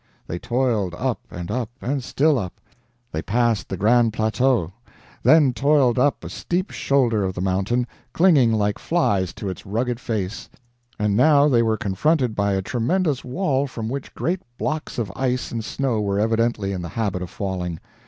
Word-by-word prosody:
They 85 Hz, -, -5 dB
toiled 115 Hz, -8 st, 0 dB
up, -, -, -1 dB
and 85 Hz, 0 st, -6 dB
up, 120 Hz, -3 st, -2 dB
and 135 Hz, +1 st, -2 dB
still 145 Hz, +1 st, +2 dB
up; 90 Hz, -4 st, -6 dB, 0.5 s
they 80 Hz, -, -2 dB
passed 115 Hz, -1 st, 0 dB
the 95 Hz, -, -3 dB
Grand 115 Hz, +3 st, +3 dB
Plateau; 110 Hz, -3 st, +1 dB, 0.5 s
then 150 Hz, -5 st, +5 dB
toiled 130 Hz, 0 st, +3 dB
up 140 Hz, +2 st, +2 dB
a -, -, -6 dB
steep 185 Hz, +3 st, -2 dB
shoulder 120 Hz, -7 st, +1 dB
of 95 Hz, -1 st, -2 dB
the -, -, -4 dB
mountain, 95 Hz, +6 st, 0 dB, 0.3 s
clinging 155 Hz, -9 st, +4 dB
like 105 Hz, -2 st, 0 dB
flies 100 Hz, -, +1 dB
to 100 Hz, -, -5 dB
its 95 Hz, -, -5 dB
rugged 115 Hz, +4 st, -2 dB
face; 110 Hz, -4 st, -4 dB, 0.5 s
and 105 Hz, -1 st, +1 dB
now 145 Hz, +4 st, +5 dB
they 120 Hz, -5 st, +4 dB
were 110 Hz, -1 st, +1 dB
confronted 125 Hz, -, +1 dB
by 100 Hz, -1 st, +1 dB
a 95 Hz, 0 st, -1 dB
tremendous 140 Hz, -, 0 dB
wall 140 Hz, 0 st, 0 dB
from 115 Hz, -4 st, -5 dB
which 135 Hz, +2 st, -6 dB
great 180 Hz, +2 st, -1 dB, 0.2 s
blocks 155 Hz, 0 st, -3 dB
of 115 Hz, -4 st, -2 dB
ice 130 Hz, -1 st, -1 dB
and 115 Hz, -1 st, -3 dB
snow 125 Hz, -1 st, -1 dB
were 100 Hz, -1 st, 0 dB
evidently 115 Hz, -2 st, +1 dB
in 95 Hz, -2 st, -3 dB
the 85 Hz, -, -5 dB
habit 100 Hz, -3 st, -2 dB
of 90 Hz, -, -5 dB
falling. 90 Hz, -4 st, -4 dB
115 Hz, 175 wpm, -22 LUFS, 100-135 Hz, 0.5 s, then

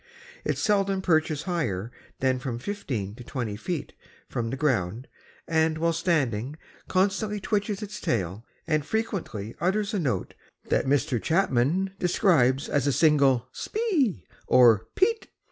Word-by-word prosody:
It -, -, -1 dB
seldom 195 Hz, -2 st, +1 dB
perches 155 Hz, -4 st, +1 dB
higher 125 Hz, -, -2 dB, 0.3 s
than 130 Hz, -1 st, +2 dB
from 125 Hz, -2 st, -4 dB
fifteen 120 Hz, -, -4 dB
to 125 Hz, -, -9 dB
twenty 120 Hz, -4 st, -4 dB
feet 160 Hz, -, -4 dB, 0.3 s
from 115 Hz, -2 st, -3 dB
the 135 Hz, -, -3 dB
ground, 120 Hz, -4 st, 0 dB, 0.4 s
and 160 Hz, -1 st, +2 dB
while 165 Hz, +1 st, +1 dB
standing 145 Hz, -, 0 dB, 0.3 s
constantly 200 Hz, +2 st, +1 dB
twitches 205 Hz, 0 st, -1 dB
its 210 Hz, 0 st, -7 dB
tail 100 Hz, -1 st, -1 dB, 0.2 s
and 155 Hz, -2 st, +1 dB
frequently 160 Hz, -, -3 dB
utters 200 Hz, +5 st, 0 dB
a 205 Hz, -, +1 dB
note 125 Hz, -, -1 dB, 0.4 s
that -, -, +1 dB
Mr. 140 Hz, -3 st, +1 dB
Chapman 170 Hz, +2 st, +1 dB
describes 155 Hz, -, +3 dB
as 145 Hz, -1 st, 0 dB
a -, -, +3 dB
single 140 Hz, -5 st, +3 dB
spee 310 Hz, -, -1 dB, 0.2 s
or 115 Hz, -4 st, +5 dB
peet. 450 Hz, +3 st, +2 dB
150 Hz, 135 wpm, -26 LUFS, 120-190 Hz, 0.4 s, or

